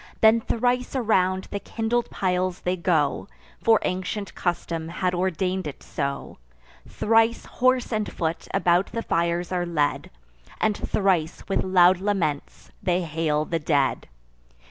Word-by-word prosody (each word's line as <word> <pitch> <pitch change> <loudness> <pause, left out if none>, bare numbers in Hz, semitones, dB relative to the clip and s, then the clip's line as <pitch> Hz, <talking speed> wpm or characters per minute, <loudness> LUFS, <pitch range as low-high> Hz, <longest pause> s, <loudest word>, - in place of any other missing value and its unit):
Then 220 +1 +6
thrice 245 +3 0
around 190 -6 +2
the 200 - -2
kindled 230 +3 -2
piles 185 -1 -1
they 180 +1 0
go 165 -5 0 0.4
(For 225 -1 +5
ancient 185 +3 -3
custom 170 -2 -2
had 180 +1 -1
ordain'd 185 0 -1
it 145 - -8
so) 140 - -4 0.5
Thrice 225 +1 +2
horse 255 -1 +1
and 215 -1 -1
foot 165 0 -3
about 180 0 +2
the 230 0 -2
fires 170 +1 0
are 180 -1 0
led; 155 -4 -1 0.5
And 215 -1 +2
thrice, 185 -7 0
with 195 - 0
loud 185 -1 +5
laments, 190 -8 -2
they 180 0 +1
hail 155 -1 0
the 165 0 -2
dead. 145 -3 0
185 Hz, 135 wpm, -24 LUFS, 170-215 Hz, 0.5 s, Then